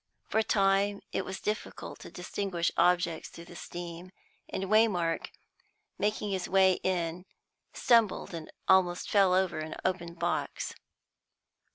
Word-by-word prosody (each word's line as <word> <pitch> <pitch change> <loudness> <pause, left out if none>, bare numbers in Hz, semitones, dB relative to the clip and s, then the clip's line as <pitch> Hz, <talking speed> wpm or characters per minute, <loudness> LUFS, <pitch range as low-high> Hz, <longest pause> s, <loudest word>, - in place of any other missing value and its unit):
For 220 - +2
a - - +3
time 200 0 +2
it - - -1
was 190 0 -5
difficult 215 +1 -4
to - - -10
distinguish 180 -1 -2
objects 175 -2 +2
through 170 - -11
the 175 - -12
steam, 175 +1 -7 0.4
and 190 - -3
Waymark, 195 -5 +2 0.7
making 210 0 0
his 190 -2 -2
way 190 -1 +4
in, 180 -1 -1 0.4
stumbled 230 -6 +2
and 165 -2 -7 0.2
almost 180 -2 +3
fell 195 -3 +5
over 185 -4 +1
an 155 0 -5
open 170 -2 -1
box. - - -2
185 Hz, 135 wpm, -30 LUFS, 175-195 Hz, 0.7 s, fell